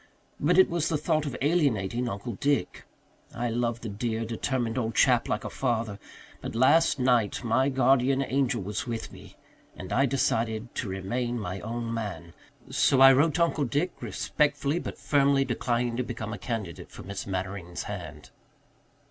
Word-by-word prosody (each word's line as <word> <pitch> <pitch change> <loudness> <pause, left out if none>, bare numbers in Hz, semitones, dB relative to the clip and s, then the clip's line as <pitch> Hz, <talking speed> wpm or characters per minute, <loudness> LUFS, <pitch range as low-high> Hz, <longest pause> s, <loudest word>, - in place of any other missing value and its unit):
But 170 +5 +2
it 190 - +7
was 170 -2 -1
the 155 - +1
thought 155 0 0
of 135 - -4
alienating 125 - +1
Uncle 100 +4 -5
Dick. 140 +8 -1 0.5
I 120 0 -1
love 115 0 -1
the 115 - -5
dear, 115 +2 -2
determined 115 +1 -2
old 115 -3 -2
chap - - +4
like - - -1
a - - -4
father. 115 -5 -1 0.4
But - - -6
last 145 +7 +4
night 125 -4 +2
my 130 +4 +2
guardian 135 0 +3
angel 130 -5 0
was 105 +5 -4
with 115 -1 -4
me - - -13 0.4
and - - -6
I 135 +2 +3
decided 115 -3 -1
to 110 - -3
remain 120 +6 -2
my 95 -2 -4
own 115 +2 -4
man. 90 -7 -5 0.4
So 135 - +3
I 135 0 +9
wrote 145 +4 +3
to 170 - +4
Uncle 160 -3 0
Dick, 145 +8 0
respectfully 150 +1 0
but - - -6
firmly 140 -1 +3
declining 120 -1 -1
to 125 - 0
become 115 -3 -5
a 105 - -6
candidate 105 -7 -5
for - - -11
Miss 100 +3 -6
Mannering's 95 -2 -4
hand." 80 -7 -8
120 Hz, 170 wpm, -27 LUFS, 110-135 Hz, 0.5 s, I